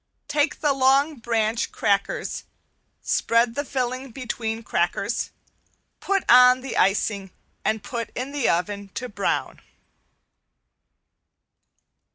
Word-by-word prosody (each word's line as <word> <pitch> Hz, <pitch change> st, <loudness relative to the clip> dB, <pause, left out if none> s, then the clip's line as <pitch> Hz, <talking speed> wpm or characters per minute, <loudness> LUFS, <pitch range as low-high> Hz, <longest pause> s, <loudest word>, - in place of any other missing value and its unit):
Take 295 Hz, +1 st, 0 dB
the 295 Hz, -2 st, +3 dB
long 275 Hz, +3 st, +3 dB
branch 230 Hz, -1 st, 0 dB
crackers, 205 Hz, -, -1 dB, 0.6 s
spread 230 Hz, 0 st, +2 dB
the 285 Hz, -, -2 dB
filling 255 Hz, -1 st, -3 dB
between 225 Hz, -2 st, -4 dB
the 230 Hz, -, -12 dB
crackers, -, -, -1 dB, 0.7 s
put 395 Hz, -1 st, 0 dB
on 250 Hz, +1 st, +7 dB
the 265 Hz, -1 st, -5 dB
icing 195 Hz, 0 st, +1 dB, 0.3 s
and 220 Hz, -1 st, 0 dB
put 230 Hz, +1 st, -4 dB
in 255 Hz, +3 st, -4 dB
the 285 Hz, -4 st, 0 dB
oven 200 Hz, +3 st, -1 dB
to 250 Hz, -, -3 dB
brown. 200 Hz, -3 st, -2 dB
245 Hz, 110 wpm, -24 LUFS, 220-270 Hz, 0.7 s, on